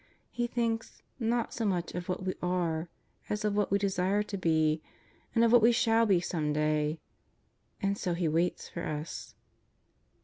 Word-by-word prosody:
He 240 0 -1
thinks, 230 -2 -2 0.2
not 235 0 0
so 235 - -3
much 180 -5 -1
of 180 0 -5
what 185 +1 -2
we 185 - 0
are 175 -2 -1 0.4
as 210 +1 -1
of 205 -1 +1
what 205 -1 +1
we 200 - +3
desire 195 +1 +1
to 210 -1 -6
be, 160 -3 +2 0.5
of 230 0 +5
what 240 -1 +7
we 230 +2 +6
shall 230 -1 +3
be 190 -4 +4
some 160 -3 -1
day. 150 +1 +1 0.8
^nd 200 0 0
so 180 -4 -1
He 170 -1 0
waits 165 +3 0
for 170 - -6
us. 150 -1 -5
185 Hz, 170 wpm, -30 LUFS, 165-225 Hz, 0.8 s, what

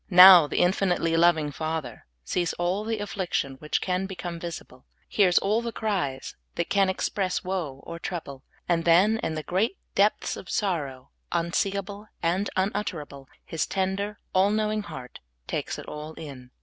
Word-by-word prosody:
Now, 180 -3 +10
the - - -3
infinitely 175 -2 +2
loving 165 -3 +3
Father 155 -6 -4 0.2
sees 175 - -1
all 180 +4 -1
the 225 0 -2
af&iction 185 -10 -3
which 150 - -1
can 185 +1 -1
become 175 -3 -6
visible, 165 -7 -8 0.2
hears 185 -4 +3
all 210 +4 +2
the 235 0 -4
cries 190 -13 -2 0.2
that 170 - -2
can 195 -1 +4
express 190 0 -1
woe 170 -8 -4
or 170 - -7
trouble, 140 -7 -6 0.2
and 170 -1 +1
then, 190 +7 +5
in 160 - -2
the 155 - -4
great 195 - 0 0.2
depths 205 +2 +2
of - - -10
sorrow 145 - -2 0.2
unseeable 200 +4 -1 0.2
and 180 +4 +1
unutterable, 175 -8 -3 0.2
His 160 -2 -2
tender, 195 +2 -1 0.2
all 190 +2 +4
knowing 215 0 0
heart 130 -11 -9 0.3
takes - - -3
it - - -8
all 150 +1 -7
in. 135 -6 -9
180 Hz, 155 wpm, -26 LUFS, 155-200 Hz, 0.3 s, Now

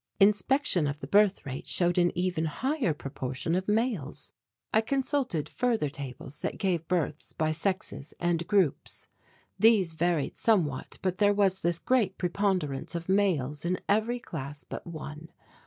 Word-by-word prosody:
Inspection 205 - +3
of 145 +1 -3
the - - -6
birth 205 -1 +3
rate 135 -1 -6
showed 175 0 +3
an 175 0 +4
even 180 -3 0
higher 260 - 0
proportion 135 +1 -4
of 185 +2 0
males. 210 - -1 0.4
I 220 - +5
consulted 260 - -1
further 230 - 0
tables 140 0 -7
that - - -3
gave 175 -5 -1
births 165 -4 -2
by 155 0 0
sexes 165 -3 -2
and 170 -1 0
groups. 195 -8 0 0.5
These 210 -7 +5
varied 165 -2 0
somewhat 175 -12 +1
but 185 -1 -1
there 205 -1 +4
was 195 -2 +2
this 170 0 +1
great 215 -3 +1
preponderance 180 -6 -1
of 170 +1 -5
males 160 -8 +1
in 180 +2 0
every 220 +4 +2
class 145 - -7
but - - -8
one. 155 -1 -8
175 Hz, 150 wpm, -29 LUFS, 155-205 Hz, 0.5 s, I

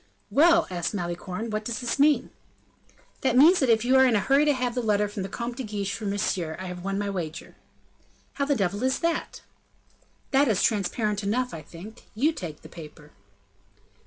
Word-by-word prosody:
"Well!" 335 +3 +5
asked 175 +3 -2
Malicorne, 180 +4 -4
"what 215 0 -2
does 230 +1 -3
this 245 +2 -3
mean?" 295 0 +3 0.9
"That 260 -2 +2
means 330 +7 +7
that 265 - +1
if 225 0 +3
you 260 +2 +4
are 265 - +7
in 240 - +2
a - - +3
hurry 275 +8 +3
to 295 - +4
have 250 -2 -2
the 250 - -1
letter 210 -2 +1
from 205 -1 -6
the 190 - -4
Comte 235 0 -5
de 265 - -4
Guiche 205 -2 -3
for 215 -1 -5
Monsieur, 190 -5 -2
I 190 - -6
have 180 -1 -7
won 195 0 -2
my 205 0 -2
wager." 165 -5 -6 0.8
"How 280 - -1
the 285 0 +1
devil 200 -1 -1
is 260 +1 +1
that?" 335 -1 -2 0.9
"That 280 0 +4
is 215 -5 +1
transparent 210 0 0
enough, 245 +5 -1
I 160 - -6
think; 180 +9 -12
you 295 +9 +2
take 165 - -8
that 155 - -13
paper." 150 -2 -12
215 Hz, 200 wpm, -26 LUFS, 190-260 Hz, 0.9 s, means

